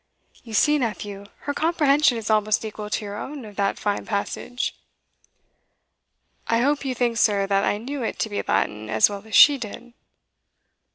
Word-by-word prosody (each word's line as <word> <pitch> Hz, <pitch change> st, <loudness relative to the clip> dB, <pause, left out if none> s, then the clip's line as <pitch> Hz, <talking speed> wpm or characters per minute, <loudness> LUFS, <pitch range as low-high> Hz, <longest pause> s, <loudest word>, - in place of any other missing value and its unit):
"You 225 Hz, -3 st, -8 dB
see, 295 Hz, +7 st, +4 dB
nephew, 205 Hz, -4 st, -4 dB, 0.2 s
her 285 Hz, -, -3 dB
comprehension 295 Hz, -4 st, +3 dB
is 225 Hz, -1 st, -3 dB
almost 215 Hz, 0 st, +2 dB
equal 210 Hz, -1 st, -6 dB
to 210 Hz, -, -2 dB
your 205 Hz, 0 st, -6 dB
own 275 Hz, +1 st, -7 dB
of 210 Hz, -1 st, -12 dB
that 200 Hz, -1 st, 0 dB
fine 205 Hz, -1 st, -2 dB
passage." 225 Hz, +4 st, -3 dB, 1.7 s
"I 230 Hz, -, +2 dB
hope 285 Hz, +3 st, +1 dB
you 260 Hz, -2 st, -2 dB
think, 240 Hz, -1 st, 0 dB
sir, 205 Hz, -3 st, +3 dB
that 195 Hz, 0 st, +1 dB
I 205 Hz, -, +1 dB
knew 265 Hz, +6 st, -5 dB
it 230 Hz, -, -3 dB
to 220 Hz, -, -1 dB
be 205 Hz, -, -1 dB
Latin 105 Hz, +1 st, -1 dB
as 110 Hz, -, +4 dB
well 200 Hz, -1 st, -6 dB
as 220 Hz, -, -3 dB
she 290 Hz, -2 st, +8 dB
did?" 240 Hz, +2 st, -8 dB
220 Hz, 175 wpm, -23 LUFS, 205-265 Hz, 1.7 s, she